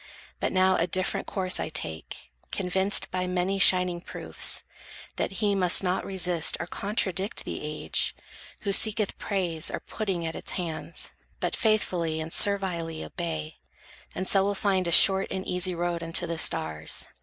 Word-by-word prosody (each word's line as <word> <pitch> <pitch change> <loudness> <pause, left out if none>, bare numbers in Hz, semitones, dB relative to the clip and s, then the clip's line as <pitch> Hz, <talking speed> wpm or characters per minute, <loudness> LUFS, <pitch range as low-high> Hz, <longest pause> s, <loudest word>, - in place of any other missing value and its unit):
But - - -1
now 185 0 +3
a 170 - 0
different 185 +1 0
course 185 -2 -1
I - - -3
take, 80 - -6 0.2
Convinced 190 +1 0
by 185 0 -2
many 180 +2 -1
shining 180 -2 +4
proofs, - - +1 0.5
that - - -2
he 205 0 0
Must 185 -1 +3
not 180 0 -1
resist 180 -4 +2
or 175 - -3
contradict 195 +1 -1
the - - -5
age, 150 0 0 0.5
Who 200 -2 -1
seeketh 215 0 +4
praise 175 -5 -1
or - - -4
pudding 190 -6 -4
at 160 - -4
its - - -6
hands, 165 -4 -4 0.3
But - - -2
faithfully 180 -8 0
and 160 +1 -5
servilely 175 -5 0
obey; 160 -3 -6 0.6
And 185 +1 -4
so 195 -1 +4
will 200 +1 -1
find 190 -3 0
a - - -1
short 195 +3 +7
and 190 - -5
easy 180 0 0
road 170 0 -2
Unto 165 0 +1
the 165 -1 -4
stars. 80 - 0
180 Hz, 160 wpm, -26 LUFS, 165-195 Hz, 0.6 s, short